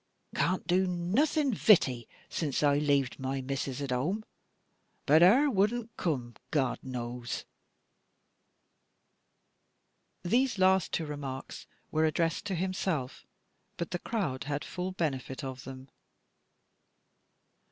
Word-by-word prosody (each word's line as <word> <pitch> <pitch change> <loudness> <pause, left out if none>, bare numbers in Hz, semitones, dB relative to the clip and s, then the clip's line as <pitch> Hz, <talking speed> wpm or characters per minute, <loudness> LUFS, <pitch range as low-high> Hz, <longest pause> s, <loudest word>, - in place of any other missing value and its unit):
Can't 180 -1 0
do 185 +2 +2
nothing 245 - +1
vitty, 135 - +4 0.3
zin 155 -4 -1
I 145 0 +4
laved 140 -4 +1
my 135 +1 -2
missus 135 0 -3
at 135 - -3
home. 175 - -1 0.8
But 155 +3 +6
her 240 +12 +7
wadn't 225 0 0
coom, 125 -8 -2 0.2
God 135 -5 0
knows." 120 -1 -5 2.8
These 240 +5 +2
last 190 -1 +3
two 165 - -1
remarks 140 -3 -6 0.2
were 155 0 +2
addressed 165 +3 0
to 195 -2 -1
himself, 180 -6 -2 0.5
but 170 - -4
the 175 - -2
crowd 175 - -2
had 145 0 -3
full 180 +1 -4
benefit 140 -6 -3
of 130 -1 -6
them. 130 0 -9
155 Hz, 110 wpm, -30 LUFS, 135-190 Hz, 2.8 s, her